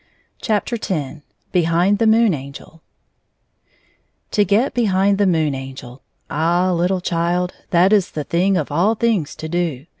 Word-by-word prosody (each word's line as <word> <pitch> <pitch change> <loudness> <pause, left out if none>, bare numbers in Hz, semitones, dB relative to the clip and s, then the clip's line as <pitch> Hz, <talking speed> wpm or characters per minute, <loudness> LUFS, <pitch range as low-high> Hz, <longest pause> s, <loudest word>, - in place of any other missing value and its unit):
F02 220 -1 -2 0.3
X - - -20 0.3
Behind 175 +3 +2
the 225 - +3
Moon 220 -2 +4
Angel 140 +3 -9 1.5
TO 210 - +3
get 205 +7 +1
behind 200 -3 +1
the 205 - +3
Moon 160 -5 +1
Angel. 130 -1 -9 0.3
Ah! 175 +4 +1
little 180 +2 0
child, 175 +1 -1 0.2
that 180 +4 +4
is 200 -4 +3
the 150 - -5
thing 185 +5 +1
of 155 -4 -3
all 185 +9 +2
things 210 -10 0
to 160 - -7
do. 160 -5 -2
175 Hz, 145 wpm, -19 LUFS, 160-200 Hz, 1.5 s, Moon